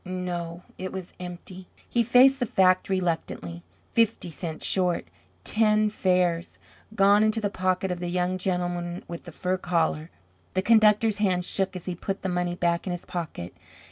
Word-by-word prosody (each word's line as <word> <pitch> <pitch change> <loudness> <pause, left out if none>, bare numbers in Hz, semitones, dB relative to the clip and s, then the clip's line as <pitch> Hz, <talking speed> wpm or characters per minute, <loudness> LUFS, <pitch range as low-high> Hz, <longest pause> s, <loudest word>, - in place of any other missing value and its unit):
No, 180 -2 -4 0.2
it 185 0 -4
was 185 -2 -7
empty! 180 +1 -8 0.2
He 240 - +1
faced 255 +4 +6
the 245 - 0
fact 185 -2 +3
reluctantly. 165 - -2 0.3
Fifty 225 -6 +1
cents 160 -1 -5
short, 180 - +1 0.4
ten 215 -1 +3
fares! 180 -4 +1 0.4
Gone 200 +1 +5
into 215 +1 +2
the 205 -2 -1
pocket 185 0 0
of 180 - -3
the 175 - -3
young 180 +1 -1
gentleman 175 -1 -2
with 170 -1 -8
the 175 - -8
fur 185 +4 -1
collar! 165 -3 0 0.5
The 185 - +1
conductor's 215 -1 +4
hand 185 -4 +1
shook 195 0 -1
as 180 - -7
he 185 - -2
put 195 +3 -5
the 190 - -1
money 180 -1 -1
back 170 +1 0
in - - -1
his 175 -1 -5
pocket. 160 - -5
185 Hz, 170 wpm, -26 LUFS, 175-195 Hz, 0.5 s, faced